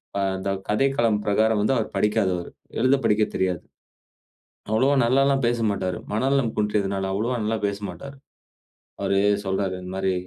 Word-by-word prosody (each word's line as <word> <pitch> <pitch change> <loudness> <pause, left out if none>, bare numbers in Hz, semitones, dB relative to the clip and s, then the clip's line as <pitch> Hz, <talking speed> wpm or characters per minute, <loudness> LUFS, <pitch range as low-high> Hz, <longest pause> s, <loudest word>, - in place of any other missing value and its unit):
ப - - 0 0.3
த - - 0 0.2
கதைக்களம் 115 -2 +2
பிரகாரம் 110 +1 +2
வந்து 120 +6 +2
அவரு 110 - -1
படிக்காதவரு. 95 -4 0 0.3
எழுத 130 +3 +4
படிக்க 105 0 +3
தெரியாது. 90 -3 0 1.1
அவ்வளவா 130 +6 +3
நல்லால்லாம் 135 +1 +3
பேசமாட்டாரு. 105 -6 0 0.2
மனநலம் 130 0 +1
குன்றியதுனால, 100 -2 0
அவ்வளவா 115 +5 -1
நல்லா 110 +1 0
பேசமாட்டாரு. 105 +8 -5 0.9
அவரு 100 - +1 0.3
சொல்றாரு. 95 -1 -1
இந்த 90 0 -8
மாதிரி, 95 -1 0
105 Hz, 130 wpm, -24 LUFS, 95-120 Hz, 1.1 s, எழுத